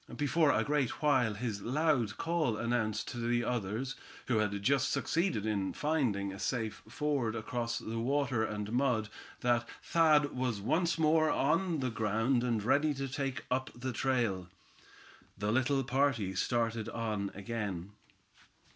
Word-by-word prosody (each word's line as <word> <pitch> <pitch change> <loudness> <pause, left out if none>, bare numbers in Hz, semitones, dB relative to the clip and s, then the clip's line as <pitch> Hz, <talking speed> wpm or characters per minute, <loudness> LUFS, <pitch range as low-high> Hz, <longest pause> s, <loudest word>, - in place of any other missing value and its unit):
Before 150 +2 +3
a - - +3
great 145 -2 -1
while 125 -7 +3
his 105 -2 -3
loud 130 -4 +1
call 165 -9 0
announced 115 -2 -1
to 120 - -5
the 120 +1 +1
others, 120 +3 -2 0.3
who 120 -4 +1
had 105 -1 0
just 135 +2 +3
succeeded 165 - 0
in 100 -3 -1
finding 120 -11 0
a 95 - -9
safe 115 -4 -2
ford 145 -6 -1
across 115 +1 -2
the 115 +1 -4
water 130 -1 +1
and 105 -1 -3
mud, 120 -4 +1 0.3
that 120 -1 +1
Thad 155 -4 +3
was 125 -4 -1
once 165 - +1
more 155 0 +4
on 165 +2 +1
the 130 -2 -1
ground, 115 +3 +1
and 115 -4 0
ready 145 +6 +2
to 135 0 -3
take 135 -1 -3
up 130 +1 0
the 125 +1 -4
trail. 115 -8 0 0.9
The 105 +2 -1
little 130 +3 +2
party 130 -7 +1
started 115 +2 0
on 105 -4 -2
again. 100 -3 -4
120 Hz, 145 wpm, -32 LUFS, 110-140 Hz, 0.9 s, more